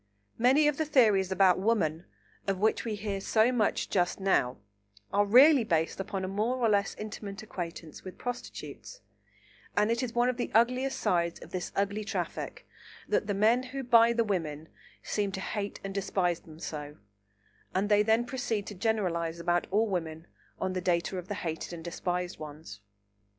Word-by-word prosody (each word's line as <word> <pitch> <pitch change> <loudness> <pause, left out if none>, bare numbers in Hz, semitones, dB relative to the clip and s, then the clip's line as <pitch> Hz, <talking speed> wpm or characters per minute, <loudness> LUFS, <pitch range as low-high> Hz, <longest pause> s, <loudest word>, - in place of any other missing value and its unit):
Many 265 +6 +5
of 295 -1 +1
the 315 - 0
theories 215 -10 +4
about 190 -1 +4
Woman, 185 -6 +1 0.4
of 195 -1 +1
which 215 +3 +1
we 220 -2 -2
hear 200 -1 -3
so 220 +4 +3
much 230 -4 +1
just 175 -1 0
now, 190 -10 +1 0.6
are 205 +1 +3
really 265 +5 +7
based 165 -5 0
upon 195 0 -3
a - - -3
more 215 +6 0
or 240 -2 +2
less 200 -1 +1
intimate 210 -1 -7
acquaintance 170 -6 -7
with 185 - -9
prostitutes, 245 - -7 0.8
and 210 +2 +3
it 235 - 0
is 245 -2 -4
one 240 +1 +3
of 250 -1 0
the 245 - -2
ugliest 250 +4 +3
sides 170 -1 0
of - - -12
this 180 -1 -4
ugly 200 +2 0
traffic 210 - -4 0.4
that - - +1
the 205 - 0
men 220 +5 +4
who 265 +1 -6
buy 235 -1 +6
the 235 0 +2
women 160 -7 -3 0.3
seem 205 -2 -1
to 190 - -3
hate 200 +1 -4
and 195 0 -5
despise 185 -3 0
them 155 -1 -14
so, 150 -2 -6 0.8
and 195 +2 +1
they 205 0 +5
then 220 +3 +3
proceed 240 -5 -2
to - - -7
generalise 180 -5 -1
about 175 +1 0
all 210 +4 +3
women 165 -5 -3 0.3
on 185 - -1
the 185 - -2
data 180 +1 0
of 180 - -9
the 205 - -3
hated 165 -1 -4
and 165 -1 -7
despised 180 +1 -3
ones. 150 -8 -9
200 Hz, 180 wpm, -29 LUFS, 175-230 Hz, 0.8 s, really